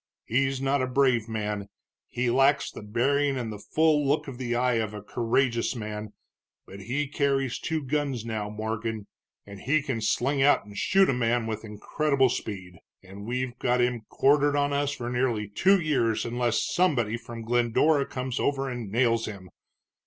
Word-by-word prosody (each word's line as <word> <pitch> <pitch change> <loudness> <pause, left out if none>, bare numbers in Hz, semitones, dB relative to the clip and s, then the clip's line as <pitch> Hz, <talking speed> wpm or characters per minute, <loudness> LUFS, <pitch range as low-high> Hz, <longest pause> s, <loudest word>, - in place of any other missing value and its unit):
He's 135 +2 +1
not 135 +1 +1
a 130 - 0
brave 125 -4 +2
man, 105 -2 -3 0.4
he 120 0 -1
lacks 135 +3 +3
the - - -9
bearing 135 +6 +1
and 115 -3 -4
the 105 - -8
full 155 +4 +2
look 145 +2 +1
of 130 -2 -8
the 120 -2 -2
eye 125 -1 +2
of 105 -1 -4
a 105 - -8
courageous 120 +2 0
man, 105 -1 -6 0.5
but 100 - -11
he 130 +9 -2
carries 135 -3 0
two 160 -2 -2
guns 135 -4 -2
now, 110 -2 -3
Morgan, 110 0 -4 0.4
and 100 -1 -10
he 145 +6 +1
can 130 -6 -3
sling 135 +6 +1
out 145 -6 +4
and 105 0 -12
shoot 195 - +3
a - - +2
man 120 -1 +1
with 110 -1 -4
incredible 135 +6 0
speed. 90 -7 -5 0.2
And 100 +3 -10
we've 125 0 -2
got 125 0 +1
him 120 -1 +1
quartered 145 +1 +3
on 145 0 +1
us 140 0 0
for 125 -4 -5
nearly 120 -4 0
two 190 - +3
years 135 -9 0
unless 120 -1 0
somebody 125 - +1
from 115 0 -8
Glendora 120 +5 +2
comes 130 -1 -4
over 135 -1 0
and 120 -5 -6
nails 115 0 +2
him. 100 -4 -8
120 Hz, 175 wpm, -27 LUFS, 110-140 Hz, 0.5 s, out